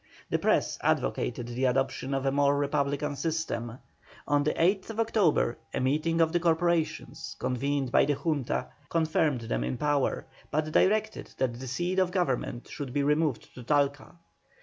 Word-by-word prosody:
The - - +2
Press - - +1
advocated 120 0 0
the 125 +2 -1
adoption 135 +1 0
of 135 0 -2
a 135 - +2
more 140 0 +3
Republican 145 0 0
system. 140 -6 -3 0.5
On 145 0 +3
the 150 - 0
8th 195 +5 +1
October 210 - +2 0.2
a - - 0
meeting 155 +5 +1
of 160 -1 +3
the 175 - +3
corporations, 170 -1 0
convened 135 +1 -1
by - - +5
the 145 0 +1
Junta, 145 -5 -1 0.2
confirmed 155 -5 +1
them - - -2
in 65 +1 -2
power, 145 -2 0 0.2
but 155 0 -1
directed 215 +5 +1
that 130 -2 0
the 130 - -6
seat 175 +9 -1
of 185 -1 +3
Government 135 -9 -1
should 140 -5 -6
be 145 0 +1
removed 150 -3 0
to 125 - -10
Talca. 140 +4 0
145 Hz, 160 wpm, -28 LUFS, 130-165 Hz, 0.5 s, by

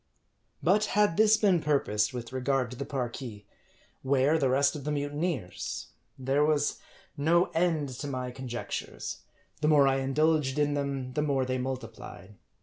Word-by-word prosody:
But 205 +5 +4
had 210 -5 +4
this 220 +2 +5
been 190 -6 +3
purposed 105 -8 +1
with 120 0 -7
regard 130 -1 0
to - - -6
the 140 +3 -5
Parki, 120 -5 -5 0.6
where 140 +4 +2
the 135 - +2
rest 140 +3 +3
of 145 - -6
the 150 - -2
mutineers? 145 - -3 0.3
There 135 +3 +1
was 150 -1 +1 0.4
no 170 +5 +2
end 165 -4 +1
to 130 +3 -6
my 130 -2 -3
conjectures; 125 -2 -5 0.4
the 150 - +2
more 145 -3 +6
I 135 0 +3
indulged 140 +1 +1
in 145 -1 +2
them, 140 -3 -3
the 150 - 0
more 140 -3 +1
they 130 0 -1
multiplied. 115 -6 -6
140 Hz, 155 wpm, -29 LUFS, 130-150 Hz, 0.6 s, more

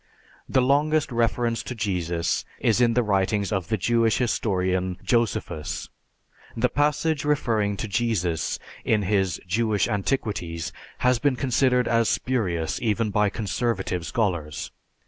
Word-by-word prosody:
The 130 - +3
longest 150 +3 +2
reference 115 0 +1
to 125 - -6
Jesus 90 -6 -1 0.2
is 115 +1 +2
in 115 -1 +3
the 125 - +3
writings 100 0 +1
of 95 -5 -1
the 110 - 0
Jewish 115 +3 +2
historian, 95 -6 0
Josephus. 115 -9 -1 0.7
The 125 +2 +2
passage 150 +1 +1
referring 115 -9 +1
to 105 - -3
Jesus 100 -8 0 0.3
in 105 -2 +2
his 95 -2 +1
"Jewish 105 +1 +1
Antiquities" 100 -6 -2 0.3
has 125 -1 +4
been 140 -1 +2
considered 125 -1 +2
as 115 -1 +2
spurious 90 -11 -1
even 110 -1 0
by 105 0 +2
conservative 100 -4 -2
scholars. 85 - -2
110 Hz, 125 wpm, -25 LUFS, 95-120 Hz, 0.7 s, has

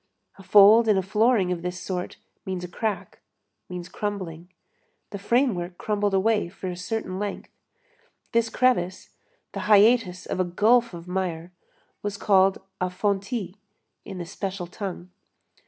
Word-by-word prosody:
A - - -10
fold 205 +4 +7
in 210 -2 +4
a 190 - +1
flooring 210 -1 +2
of 175 -2 -2
this 180 +1 -4
sort 180 -2 -4 0.3
means 185 -2 -4
a - - -4
crack, 210 +2 -4 0.5
means 180 -1 -6
crumbling. 185 -4 -5 0.6
The 200 - -6
framework 200 -6 0
crumbled 205 -2 0
away 210 -1 +2
for 185 0 -6
a 180 - -4
certain 185 0 -4
length. 205 -1 -5 0.8
This 230 0 +2
crevice, 225 -7 0 0.4
the - - -5
hiatus 210 -3 +4
of - - -4
a - - +4
gulf 220 +5 +2
of 170 +1 -10
mire, 180 -2 -3 0.5
was 205 -1 -4
called 195 -2 +4 0.2
a 185 - +1
fontis, 200 +1 -2 0.5
in 195 - -8
the 175 - -5
special 190 +1 -5
tongue. 180 -1 -7
190 Hz, 145 wpm, -25 LUFS, 180-210 Hz, 0.8 s, fold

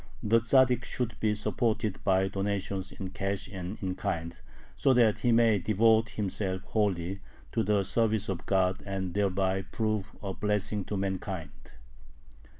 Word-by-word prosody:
The 115 +2 +4
Tzaddik 125 +1 +4
should 120 -2 -2
be 105 -1 +1
supported 110 -1 -1
by 95 -1 +3
donations 100 -1 -2
in 95 -2 -6
cash 100 0 -3
and 95 0 -6
in 95 -1 -1
kind, 85 -2 -3 0.4
so 135 -2 +3
that 115 -4 +4
he 120 - +2
may 115 -3 +4
devote 110 +3 +3
himself 95 -3 -2
wholly 95 -3 -1 0.3
to 115 - +1
the 105 -2 +2
service 110 +1 +1
of 95 -3 -4
God 95 0 +2
and 95 -3 -3
thereby 95 -1 +1
prove 110 0 -2 0.2
a 95 -1 -3
blessing 105 0 -1
to 105 - -3
mankind. 95 -2 -5
100 Hz, 150 wpm, -29 LUFS, 95-110 Hz, 0.4 s, The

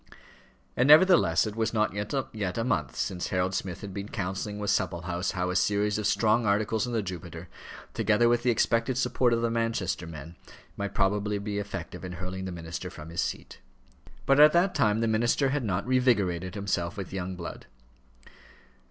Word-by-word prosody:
And 125 - +2
nevertheless 170 +1 +6
it 105 -1 -5
was 115 0 -1
not 105 -2 +1
yet 105 -3 -3
a 115 - 0
month 80 - -1
since 90 -3 -2
Harold 95 +1 0
Smith 90 -3 -4
had 100 -2 -7
been 100 +1 -6
counselling 95 +2 -4
with 105 -1 -1
Supplehouse 85 +1 -1
how 90 -1 -1
a - - -3
series 105 +2 +1
of 105 - 0
strong 110 +1 +2
articles 105 +2 +1
in 120 - -4
the 110 -2 0
Jupiter, 90 -3 -7 0.5
together 110 +1 +2
with 120 0 +3
the 125 - +1
expected 115 +1 +1
support 125 0 +1
of 115 0 +1
the 115 - +1
Manchester 115 -7 -1
men, 80 +1 -9 0.4
might 100 0 -4
probably 105 +1 +1
be 100 0 -3
effective 100 -2 -6
in 90 -1 -6
hurling 95 +1 -5
the 95 - -4
minister 85 -1 -6
from 75 +1 -10
his 85 +1 -2
seat. - - -5 0.7
But 135 +1 +4
at 150 +1 +8
that 180 +2 +3
time 110 +1 +2
the 115 - +1
minister 120 +5 +2
had 140 0 -1
not 100 -3 -1
revigorated 100 -9 +1
himself 100 -2 -2
with 95 -1 -6
young 95 -1 -4
blood. 85 -1 -8
105 Hz, 185 wpm, -28 LUFS, 90-115 Hz, 0.7 s, at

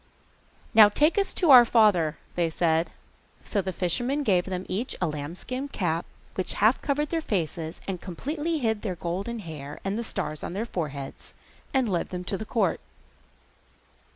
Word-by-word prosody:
'Now 215 -2 +9
take 300 - +3
us 395 - 0
to 340 -6 +4
our 250 -2 +11
father,' 205 -10 +3 0.2
said 165 -1 +1
they. - - -22 0.5
So 205 - +1
the 190 0 -3
fisherman 240 - -1
gave 185 -7 +3
them 185 -1 -4
each 220 +7 -2
a 180 - +1
lambskin 170 - -4
cap 175 - -2 0.3
which 185 - -1
half 220 +5 +3
covered 295 +1 0
their 330 -1 0
faces, 165 - -3
and 185 -3 -3
completely 295 - -3
hid 220 -6 0
their 190 -5 -3
golden 195 +7 -3
hair 150 -5 -8
and 195 +3 -1
the - - -2
stars 155 -8 -4
on - - -4
their 210 +4 -2
foreheads, 145 -10 -6 0.4
and 260 -3 +2
led 180 -5 -1
them 180 -1 -5
to 195 +2 -2
the 220 - -5
court. 210 -4 +1
195 Hz, 170 wpm, -27 LUFS, 170-240 Hz, 0.5 s, our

